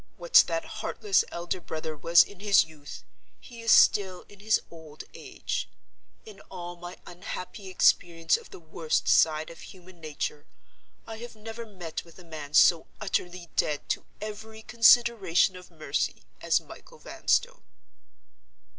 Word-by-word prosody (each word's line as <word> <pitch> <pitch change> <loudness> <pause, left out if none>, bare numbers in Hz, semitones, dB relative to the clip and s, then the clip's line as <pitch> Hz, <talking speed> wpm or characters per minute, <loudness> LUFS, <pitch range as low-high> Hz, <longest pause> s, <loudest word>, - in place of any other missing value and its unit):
What - - -10
that - - -2
heartless 410 -3 0
elder 175 +1 -4
brother 155 -1 -5
was 170 +3 +5
in 200 - -15
his 200 -3 +4
youth, 150 -3 -12 0.4
he 235 -3 -12
is 230 -1 +1
still 190 -3 +4
in 205 - -17
his 220 +1 +2
old 160 -2 -11
age. - - -5 0.6
In 210 -3 -13
all 175 -1 -7
my 175 +1 -10
unhappy 185 +2 -8
experience 165 -2 +2
of - - -8
the - - -11
worst 160 -1 -2
side 155 0 +3
of 165 - -13
human 185 -1 -14
nature, 150 -1 -5 0.6
I 225 - -8
have 235 0 -10
never 225 +2 -8
met 175 -6 -7
with 170 -1 -18
a 180 - -13
man 155 -3 -8
so 165 0 +5
utterly 180 -4 -3
dead 150 -1 -1
to - - -1 0.2
every 220 +1 -8
consideration 230 -7 +4
of 180 0 -12
mercy 155 -4 -3 0.2
as - - +2
Michael 485 - -14
Vanstone." - - -1
180 Hz, 145 wpm, -27 LUFS, 165-215 Hz, 0.6 s, was